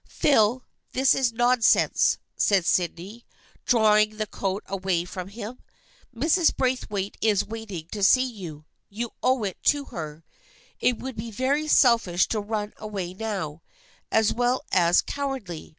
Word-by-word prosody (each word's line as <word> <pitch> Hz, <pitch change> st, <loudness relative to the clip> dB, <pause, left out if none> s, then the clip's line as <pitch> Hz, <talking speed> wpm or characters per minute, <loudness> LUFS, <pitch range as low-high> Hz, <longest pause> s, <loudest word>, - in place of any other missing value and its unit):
" -, -, -30 dB, 0.2 s
Phil, 245 Hz, -2 st, +3 dB, 0.3 s
this 265 Hz, +1 st, +4 dB
is 255 Hz, -3 st, +1 dB
nonsense," 240 Hz, 0 st, +3 dB, 0.2 s
said 195 Hz, -4 st, +2 dB
Sydney, 180 Hz, +7 st, -1 dB, 0.4 s
drawing 215 Hz, -2 st, +4 dB
the 215 Hz, -, -1 dB
coat 195 Hz, -1 st, -3 dB
away 185 Hz, -3 st, -1 dB
from 180 Hz, 0 st, -7 dB
him. 220 Hz, +4 st, -8 dB, 0.3 s
" -, -, -32 dB
Mrs. 335 Hz, +1 st, +3 dB
Braithwaite 210 Hz, -6 st, -2 dB
is 210 Hz, -3 st, +2 dB
waiting 215 Hz, -7 st, -7 dB
to 210 Hz, -, -5 dB
see 255 Hz, +6 st, +5 dB
you. 175 Hz, -, -8 dB, 0.2 s
You 230 Hz, +3 st, -5 dB
owe 255 Hz, -3 st, +2 dB
it 195 Hz, -3 st, -4 dB
to 290 Hz, -1 st, +2 dB
her. 155 Hz, -1 st, -7 dB, 0.5 s
It 250 Hz, -2 st, +2 dB
would 260 Hz, -2 st, -7 dB
be 225 Hz, +2 st, -5 dB
very 270 Hz, +7 st, -1 dB
selfish 230 Hz, -, +4 dB
to 220 Hz, -, -1 dB
run 210 Hz, 0 st, -4 dB
away 195 Hz, -5 st, -5 dB
now, 185 Hz, -7 st, -4 dB, 0.5 s
as 220 Hz, -1 st, +3 dB
well 245 Hz, +2 st, 0 dB
as 175 Hz, -1 st, +4 dB
cowardly. 265 Hz, -, -5 dB
215 Hz, 150 wpm, -25 LUFS, 190-245 Hz, 0.5 s, see